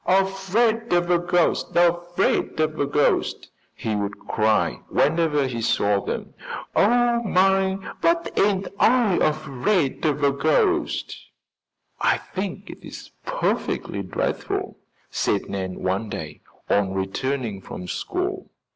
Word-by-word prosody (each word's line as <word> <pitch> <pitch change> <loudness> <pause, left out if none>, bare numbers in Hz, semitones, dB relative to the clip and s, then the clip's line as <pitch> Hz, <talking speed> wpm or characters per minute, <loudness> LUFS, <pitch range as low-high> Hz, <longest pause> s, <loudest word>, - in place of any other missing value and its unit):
"Afraid 195 +4 +2
of 175 0 +2
a 175 - +4
ghost! 175 0 +1
Afraid 175 -1 +2
of 155 0 0
a 145 - +1
ghost!" 145 +1 +1 0.2
he 110 -1 -2
would 100 -1 -2
cry, 110 0 +1
whenever 155 -4 +2
he 120 -3 -3
saw 100 -2 +2
them. - - -4 0.4
"Oh, 240 +1 +4
my, 190 -2 +3 0.2
but 335 0 +2
ain't 195 -1 +2
I 235 -6 +4
afraid 155 +1 0
of 145 -1 +1
a 140 - +5
ghost!" 365 - +1 0.9
"I - - +3
think 190 0 -6
it - - -13
is - - -10 0.2
perfectly 100 - -1
dreadful," 90 - -3 0.3
said - - 0
Nan 95 -2 -4
one 95 +4 -1
day, - - -6 0.3
on 95 -2 +1
returning 110 +2 -2
from 90 - -8
school. 370 - -3
170 Hz, 120 wpm, -23 LUFS, -, 0.9 s, a